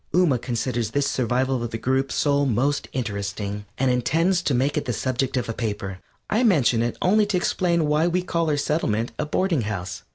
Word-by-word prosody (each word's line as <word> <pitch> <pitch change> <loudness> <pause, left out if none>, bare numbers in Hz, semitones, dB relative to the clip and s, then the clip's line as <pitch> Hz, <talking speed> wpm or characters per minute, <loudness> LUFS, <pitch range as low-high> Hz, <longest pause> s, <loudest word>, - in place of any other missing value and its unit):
Ooma 160 -10 +3
considers 120 -2 -2
this 140 +4 0
survival 130 0 0
of 120 - -3
the 115 - -4
group 130 +3 0
soul 145 -1 +2
most 135 +5 0
interesting, 105 -3 -4
and 130 -1 +2
intends 165 +9 +2
to 145 -6 0
make 135 +4 +1
it 150 - -1
the 125 - -1
subject 130 +2 -1
of 125 - -1
a 115 - -2
paper. 105 -5 -4 0.3
I 220 - +1
mention 140 - +3
it 120 0 -1
only 205 +3 +4
to 200 -3 +1
explain 170 -2 +1
why 150 +3 +2
we 180 +1 0
call 170 -3 0
our 150 - +1
Settlement 120 -7 0
a 150 - -1
Boarding 170 -2 +1
House. 95 -5 -4
130 Hz, 200 wpm, -24 LUFS, 115-160 Hz, 0.3 s, only